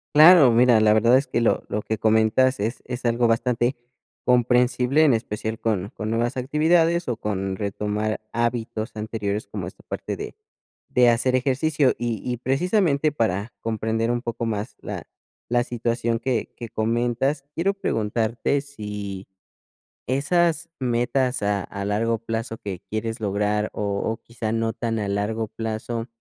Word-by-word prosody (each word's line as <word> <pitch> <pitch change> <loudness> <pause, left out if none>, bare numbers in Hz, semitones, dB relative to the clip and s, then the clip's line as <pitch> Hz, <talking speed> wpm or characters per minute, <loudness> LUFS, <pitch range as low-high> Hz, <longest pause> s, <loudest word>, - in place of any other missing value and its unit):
Claro, 155 -4 +9
mira, 120 -1 +5
la 105 0 +5
verdad 115 +4 +5
es 135 - 0
que 125 -2 -1
lo 115 - +2
lo 105 - -1
que 110 - -3
comentas 110 +4 +3
es 110 +4 -3
es 125 0 -5
algo 120 0 +3
bastante 120 +2 +1 0.5
comprensible, 125 +3 +3
en 130 -6 +5
especial 110 0 -4
con 105 -3 -1
con 110 0 -5
nuevas 120 +3 0
actividades 165 +5 +2
o 120 -2 -1
con 95 -3 -2
retomar 105 +2 -2
hábitos 115 -1 -2
anteriores 105 0 -3
como - - -5
esta - - -10
parte - - -5
de - - -7 0.5
de 125 -1 +5
hacer 125 +2 +2
ejercicio. 140 +2 +2
Y 115 -3 -2
y 125 -1 -2
precisamente 155 - +1
para 110 -5 -1
comprender 115 +1 -1
un 120 0 -1
poco 115 -1 -3
más 110 0 -3
la - - -5 0.5
la 120 0 +2
situación 115 -1 -1
que 125 -2 -2
que 120 -2 -7
comentas, 120 +6 0
quiero 195 +4 +1
preguntarte 115 - -1
si 105 -8 -7 0.8
esas 165 +5 +1
metas 125 0 0
a 100 -1 +1
a 100 0 -6
largo 115 +3 +1
plazo 115 0 -4
que 95 -2 -6
quieres 110 +1 -3
lograr 105 0 0
o - - -4 0.2
o 110 - -1
quizá 115 -2 -5
no 115 0 0
tan 115 -1 -2
a 105 -2 -2
largo 110 +3 -1
plazo, 115 +2 -4
115 Hz, 155 wpm, -24 LUFS, 110-130 Hz, 0.8 s, Claro